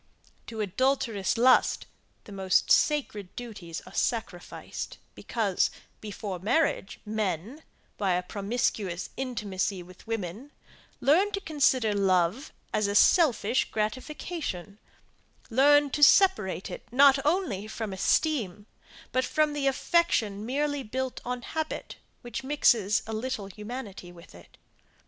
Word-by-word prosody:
To 225 Hz, -2 st, -5 dB
adulterous 225 Hz, -1 st, 0 dB
lust 255 Hz, +2 st, +4 dB, 0.4 s
the -, -, -13 dB
most 190 Hz, -1 st, +1 dB
sacred 215 Hz, -11 st, +1 dB
duties 205 Hz, -9 st, -7 dB
are 185 Hz, -, -13 dB
sacrificed, 200 Hz, -7 st, -4 dB, 0.2 s
because, 210 Hz, -6 st, 0 dB, 0.3 s
before 205 Hz, -3 st, -6 dB
marriage, 225 Hz, -, 0 dB
men, 215 Hz, -, -3 dB, 0.4 s
by 195 Hz, -3 st, +1 dB
a 180 Hz, +1 st, 0 dB
promiscuous 200 Hz, -2 st, -2 dB
intimacy 205 Hz, -7 st, -3 dB
with 180 Hz, +3 st, -16 dB
women, 225 Hz, +5 st, -5 dB, 0.5 s
learned 380 Hz, +9 st, +3 dB
to -, -, -3 dB
consider 265 Hz, -, +2 dB
love 195 Hz, -, +1 dB, 0.2 s
as 210 Hz, -, +1 dB
a 200 Hz, -, -2 dB
selfish 255 Hz, -, +4 dB
gratification 215 Hz, -, -4 dB, 0.7 s
learned 285 Hz, +3 st, +5 dB
to 295 Hz, -, -2 dB
separate 290 Hz, -, +4 dB
it -, -, -9 dB
not 275 Hz, +1 st, +5 dB
only 290 Hz, -, 0 dB
from 220 Hz, -2 st, -5 dB
esteem, 205 Hz, -, 0 dB, 0.5 s
but 255 Hz, -, +1 dB
from 305 Hz, +3 st, +1 dB
the 285 Hz, -2 st, -1 dB
affection 260 Hz, -8 st, +1 dB
merely 285 Hz, +2 st, -1 dB
built 260 Hz, +2 st, -4 dB
on 250 Hz, 0 st, -4 dB
habit, 315 Hz, +3 st, -4 dB, 0.3 s
which 240 Hz, +2 st, -5 dB
mixes 235 Hz, -7 st, +2 dB
a 225 Hz, -, -6 dB
little 220 Hz, -1 st, -3 dB
humanity 210 Hz, -2 st, -8 dB
with 170 Hz, -1 st, -15 dB
it. 85 Hz, 0 st, -17 dB
225 Hz, 120 wpm, -28 LUFS, 195-275 Hz, 0.7 s, learned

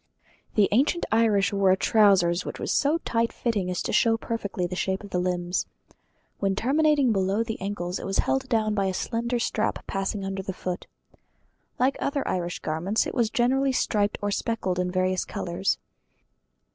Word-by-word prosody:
The 205 Hz, -3 st, +5 dB
ancient 275 Hz, +10 st, +2 dB
Irish 210 Hz, -4 st, +3 dB
wore 195 Hz, -1 st, +3 dB
a 185 Hz, -, +4 dB
trousers 190 Hz, -5 st, +4 dB
which -, -, -6 dB
was -, -, -2 dB
so 290 Hz, +3 st, +2 dB
tight 230 Hz, 0 st, +1 dB
fitting 210 Hz, -6 st, -1 dB
as 180 Hz, -, -2 dB
to -, -, -3 dB
show 225 Hz, -1 st, +4 dB
perfectly 205 Hz, -6 st, -3 dB
the 180 Hz, +1 st, -4 dB
shape 190 Hz, +2 st, -1 dB
of 200 Hz, -, -10 dB
the 180 Hz, -, 0 dB
limbs. 180 Hz, 0 st, -1 dB, 0.7 s
When 195 Hz, -1 st, +1 dB
terminating 285 Hz, +2 st, +3 dB
below 195 Hz, +2 st, +1 dB
the 225 Hz, -3 st, -5 dB
ankles 190 Hz, -2 st, -3 dB
it -, -, -6 dB
was 195 Hz, -, -1 dB
held 265 Hz, 0 st, 0 dB
down 220 Hz, -3 st, +1 dB
by 200 Hz, -2 st, +1 dB
a 190 Hz, -1 st, -1 dB
slender 235 Hz, +3 st, -1 dB
strap 225 Hz, -2 st, -1 dB
passing 195 Hz, 0 st, -2 dB
under 195 Hz, 0 st, -3 dB
the 190 Hz, 0 st, -5 dB
foot. 180 Hz, -1 st, -5 dB, 0.9 s
Like 260 Hz, +2 st, +2 dB
other 280 Hz, 0 st, -1 dB
Irish 175 Hz, -1 st, -2 dB
garments 175 Hz, +8 st, 0 dB
it -, -, -4 dB
was 235 Hz, -4 st, +1 dB
generally 265 Hz, +4 st, +2 dB
striped 210 Hz, -4 st, +1 dB
or 205 Hz, -, 0 dB
speckled 195 Hz, -4 st, -1 dB
in 180 Hz, 0 st, 0 dB
various 185 Hz, 0 st, 0 dB
colours. 180 Hz, +2 st, -2 dB
200 Hz, 180 wpm, -26 LUFS, 185-230 Hz, 0.9 s, The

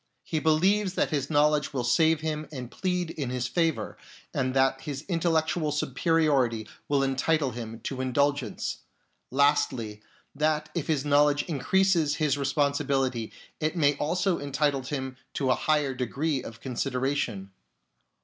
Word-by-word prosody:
He 160 Hz, -, -2 dB
believes 185 Hz, +5 st, +2 dB
that -, -, +1 dB
his 145 Hz, -3 st, -1 dB
knowledge 150 Hz, -1 st, +2 dB
will 130 Hz, -3 st, -1 dB
save 160 Hz, +6 st, +3 dB
him 155 Hz, -1 st, -3 dB
and 125 Hz, -4 st, -7 dB
plead 180 Hz, -2 st, -1 dB
in 140 Hz, -6 st, -4 dB
his 125 Hz, -1 st, -2 dB
favour, 165 Hz, +2 st, -1 dB, 0.3 s
and 130 Hz, 0 st, -1 dB
that 135 Hz, 0 st, +3 dB
his 140 Hz, +1 st, -6 dB
intellectual 165 Hz, -3 st, +1 dB
superiority 140 Hz, -6 st, +1 dB, 0.2 s
will 140 Hz, -1 st, +3 dB
entitle 135 Hz, +1 st, +1 dB
him 115 Hz, -1 st, -7 dB
to 130 Hz, -2 st, -4 dB
indulgence; 135 Hz, -2 st, 0 dB, 0.5 s
lastly, 130 Hz, -6 st, +1 dB, 0.3 s
that 150 Hz, +1 st, 0 dB
if 170 Hz, -5 st, -3 dB
his 150 Hz, -3 st, 0 dB
knowledge 145 Hz, 0 st, +4 dB
increases 165 Hz, 0 st, +2 dB
his 150 Hz, -3 st, +1 dB
responsibility, 140 Hz, -4 st, 0 dB, 0.3 s
it 155 Hz, +2 st, -1 dB
may 145 Hz, -3 st, +3 dB
also 180 Hz, +4 st, 0 dB
entitle 145 Hz, 0 st, 0 dB
him 130 Hz, -1 st, -4 dB, 0.2 s
to 135 Hz, -3 st, +1 dB
a -, -, +4 dB
higher 150 Hz, -3 st, +1 dB
degree 135 Hz, +3 st, -1 dB
of 115 Hz, -2 st, -10 dB
con 130 Hz, -, -5 dB
sideration. 125 Hz, -6 st, -1 dB
145 Hz, 140 wpm, -27 LUFS, 130-155 Hz, 0.5 s, knowledge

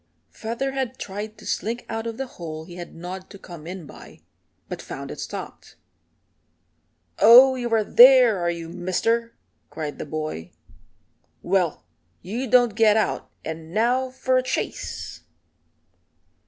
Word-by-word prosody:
Featherhead 260 Hz, +2 st, -3 dB
tried 210 Hz, +2 st, -6 dB
to -, -, -14 dB
slink 235 Hz, +3 st, -3 dB
out 225 Hz, 0 st, -4 dB
of 230 Hz, -1 st, -5 dB
the 270 Hz, -, -3 dB
hole 160 Hz, -9 st, -8 dB
he 175 Hz, +1 st, -11 dB
had 175 Hz, -1 st, -9 dB
gnawed 185 Hz, +3 st, -7 dB
to 200 Hz, -, -11 dB
come 170 Hz, -4 st, -11 dB
in 180 Hz, -2 st, -7 dB
by, -, -, -14 dB, 0.5 s
but -, -, -6 dB
found -, -, -7 dB
it -, -, -8 dB
stopped. -, -, -8 dB, 1.4 s
"Oh, 250 Hz, +4 st, +9 dB
you 245 Hz, -2 st, -3 dB
are 225 Hz, -1 st, +3 dB
there, 245 Hz, -2 st, +7 dB
are 175 Hz, 0 st, 0 dB
you, 170 Hz, -1 st, -4 dB
Mister?" 185 Hz, +7 st, -1 dB, 0.3 s
cried 150 Hz, -2 st, -6 dB
the -, -, -5 dB
boy. 155 Hz, -, -5 dB, 0.9 s
"Well, 175 Hz, -, 0 dB, 0.4 s
you 230 Hz, +9 st, -3 dB
don't 245 Hz, -2 st, +5 dB
get 220 Hz, 0 st, +4 dB
out, 220 Hz, -, -1 dB, 0.2 s
and 160 Hz, +2 st, -7 dB
now 250 Hz, +4 st, +2 dB
for 260 Hz, 0 st, 0 dB
a -, -, +3 dB
chase." 255 Hz, -, -4 dB
215 Hz, 140 wpm, -24 LUFS, 175-245 Hz, 1.4 s, Oh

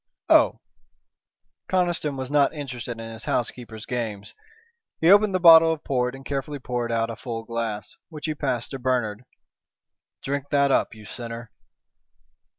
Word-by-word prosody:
"Oh!" -, -, +5 dB, 1.1 s
Conniston 175 Hz, -6 st, 0 dB
was 130 Hz, +1 st, -5 dB
not 145 Hz, +1 st, +3 dB
interested 125 Hz, -5 st, -6 dB
in 115 Hz, 0 st, -7 dB
his 110 Hz, -, -8 dB
housekeeper's 115 Hz, -2 st, -3 dB
games. 110 Hz, -5 st, -4 dB, 0.7 s
He 165 Hz, +3 st, +5 dB
opened 205 Hz, -1 st, +5 dB
the -, -, +2 dB
bottle 165 Hz, -2 st, +8 dB
of 160 Hz, -1 st, -4 dB
port 125 Hz, -1 st, -1 dB
and 135 Hz, 0 st, -12 dB
carefully 140 Hz, +1 st, -3 dB
poured 120 Hz, -3 st, -3 dB
out 115 Hz, 0 st, 0 dB
a -, -, -6 dB
full 115 Hz, 0 st, -6 dB
glass, 115 Hz, -2 st, -4 dB
which 155 Hz, -3 st, -7 dB
he 155 Hz, -, -1 dB
passed 130 Hz, -5 st, -2 dB
to 135 Hz, -, -5 dB
Bernard. 125 Hz, -3 st, -1 dB, 1.0 s
"Drink 140 Hz, 0 st, -3 dB
that 140 Hz, -1 st, +3 dB
up, 115 Hz, -, +1 dB
you 110 Hz, -1 st, -13 dB
sinner." 115 Hz, 0 st, -7 dB
125 Hz, 155 wpm, -24 LUFS, 115-145 Hz, 1.1 s, bottle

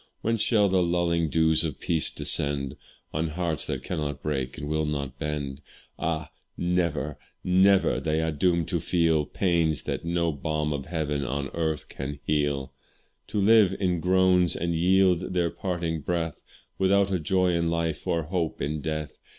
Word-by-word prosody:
When 115 Hz, +1 st, +1 dB
shall 105 Hz, -1 st, +3 dB
the 95 Hz, -1 st, +2 dB
lulling 85 Hz, -2 st, +1 dB
dews 80 Hz, 0 st, +3 dB
of 75 Hz, -5 st, -4 dB
peace 80 Hz, -2 st, +1 dB
descend 70 Hz, -2 st, +1 dB, 0.4 s
On 80 Hz, +2 st, 0 dB
hearts 80 Hz, -1 st, -2 dB
that 65 Hz, -, -3 dB
cannot 75 Hz, -5 st, -4 dB
break 65 Hz, -4 st, -2 dB
and 75 Hz, -, -5 dB
will 80 Hz, +1 st, 0 dB
not 70 Hz, -3 st, -4 dB
bend? 75 Hz, -2 st, -4 dB, 0.4 s
Ah! 80 Hz, -2 st, -2 dB, 0.3 s
never, 85 Hz, -5 st, -1 dB, 0.2 s
never 95 Hz, +1 st, +4 dB
they 80 Hz, 0 st, 0 dB
are 80 Hz, 0 st, 0 dB
doomed 85 Hz, +2 st, +1 dB
to -, -, 0 dB
feel 80 Hz, -4 st, +2 dB
Pains 85 Hz, -6 st, +1 dB
that -, -, -3 dB
no 85 Hz, 0 st, 0 dB
balm 75 Hz, +1 st, -2 dB
of 70 Hz, -2 st, -5 dB
heaven 75 Hz, -4 st, -2 dB
or 70 Hz, +1 st, -3 dB
earth 80 Hz, -2 st, -2 dB
can 70 Hz, +1 st, -6 dB
heal; 70 Hz, -3 st, 0 dB, 0.5 s
To 105 Hz, -, -2 dB
live 100 Hz, -2 st, +5 dB
in 90 Hz, -3 st, +1 dB
groans, 90 Hz, 0 st, +3 dB
and 85 Hz, +1 st, -1 dB
yield 90 Hz, +1 st, +2 dB
their 85 Hz, -2 st, +1 dB
parting 85 Hz, -4 st, -3 dB
breath 85 Hz, -1 st, -2 dB, 0.4 s
Without 100 Hz, +1 st, +3 dB
a 95 Hz, -, +1 dB
joy 90 Hz, +3 st, +2 dB
in 85 Hz, -1 st, +1 dB
life 85 Hz, -2 st, -2 dB
or 85 Hz, -1 st, +1 dB
hope 85 Hz, 0 st, -2 dB
in 75 Hz, +1 st, -2 dB
death. 75 Hz, 0 st, -4 dB
80 Hz, 165 wpm, -26 LUFS, 75-90 Hz, 0.5 s, live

